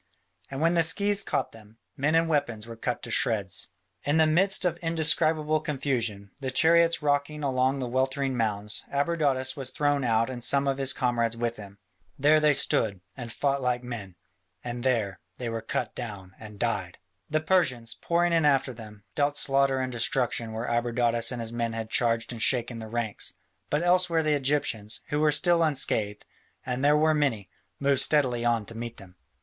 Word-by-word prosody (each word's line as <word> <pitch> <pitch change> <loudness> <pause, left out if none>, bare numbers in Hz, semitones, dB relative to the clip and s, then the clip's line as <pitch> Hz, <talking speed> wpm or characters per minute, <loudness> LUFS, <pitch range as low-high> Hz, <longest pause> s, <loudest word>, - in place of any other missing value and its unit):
And 135 +1 -5
where 165 +1 +3
the 170 -1 +3
scythes 200 +5 +2
caught - - -2
them, 110 0 -17 0.2
men 145 +4 +1
and 165 0 +3
weapons 140 -9 -1
were 115 0 -9
cut 120 +2 -3
to 120 - -6
shreds. 100 -5 0 0.4
In 145 +2 +1
the 160 - +5
midst 185 +5 +3
of 180 - 0
indescribable 155 -1 +2
confusion, 120 -9 -2
the 130 - -2
chariots 165 +4 +3
rocking 145 +1 0
among 130 0 +1
the 130 -2 -3
weltering 130 +1 -1
mounds, 105 -3 -1
Abradatas 140 -3 0
was 135 -3 -3
thrown 145 +1 0
out 115 -1 +2
and 125 -2 -6
some 140 +1 +2
of 135 0 0
his 135 -1 +1
comrades 120 -3 0
with 120 0 -2
him. 100 -1 -11 0.4
There 150 +3 +4
they 150 -1 +4
stood, 110 -7 +2
and 120 -3 -7
fought 140 +2 -1
like 125 -1 -1
men, 110 -7 -7 0.5
and 120 0 -5
there 115 -7 0 0.2
they 120 -2 -4
were 115 0 -4
cut 115 0 -3
down 100 -6 -7
and 105 -1 -11
died. 100 -6 -2 0.3
The 155 - +1
Persians, 150 -9 0
pouring 170 0 +1
in 165 -1 +3
after 135 -3 +2
them, 105 -3 -12
dealt 145 0 0
slaughter 135 -1 +1
and 130 0 -2
destruction 120 -2 0
where 110 +2 -4
Abradatas 120 0 +1
and 125 - -4
his 115 0 -3
men 115 -1 -2
had 115 -1 -5
charged 115 -1 +1
and 115 -2 -6
shaken 120 -1 +2
the 110 - -7
ranks, 115 -2 -3 0.3
but 150 +3 0
elsewhere 175 -2 +2
the 155 -1 +2
Egyptians, 130 -6 -1
who 150 - 0
were 155 0 +3
still 170 +3 +3
unscathed, 110 -9 0 0.4
and 125 +1 -3
they 145 - +5
were 155 +1 +3
many, 130 - -1 0.3
moved 140 -1 +3
steadily 130 -6 +2
on 115 -3 +1
to 115 - -8
meet 120 0 -6
them. 95 -2 -14
130 Hz, 185 wpm, -27 LUFS, 115-150 Hz, 0.5 s, the